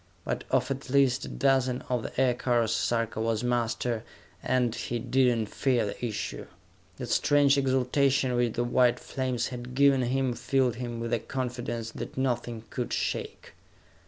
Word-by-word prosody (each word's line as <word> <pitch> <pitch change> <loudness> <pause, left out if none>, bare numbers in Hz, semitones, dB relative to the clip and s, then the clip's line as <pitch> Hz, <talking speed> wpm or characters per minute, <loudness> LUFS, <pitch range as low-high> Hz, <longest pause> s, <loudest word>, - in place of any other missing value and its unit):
But - - -3
of - - +1
at 135 0 -4
least 135 -1 +3
a - - -7
dozen 130 -2 +1
of 125 -2 -1
the - - -5
aircars, 120 -3 +2
Sarka 115 -2 0
was 115 0 0
master, 120 -1 -1 0.4
and 125 -3 +1
he 120 - -3
did 125 0 +2
not 110 -2 -2
fear 125 -5 +1
the 100 - -6
issue. 115 -3 -4 0.5
That - - -5
strange 145 -1 +4
exaltation 135 0 +2
which 120 -2 +1
the 120 - 0
white 120 0 +3
flames 130 -3 -2
had 125 0 -7
given 140 -1 +5
him 130 +1 0
filled 120 0 0
him 120 -2 -4
with 115 +1 -3
a 120 - +2
confidence 120 -3 -4
that - - -7
nothing 120 -3 -1
could 125 - -3
shake. - - -3
125 Hz, 160 wpm, -28 LUFS, 120-130 Hz, 0.5 s, given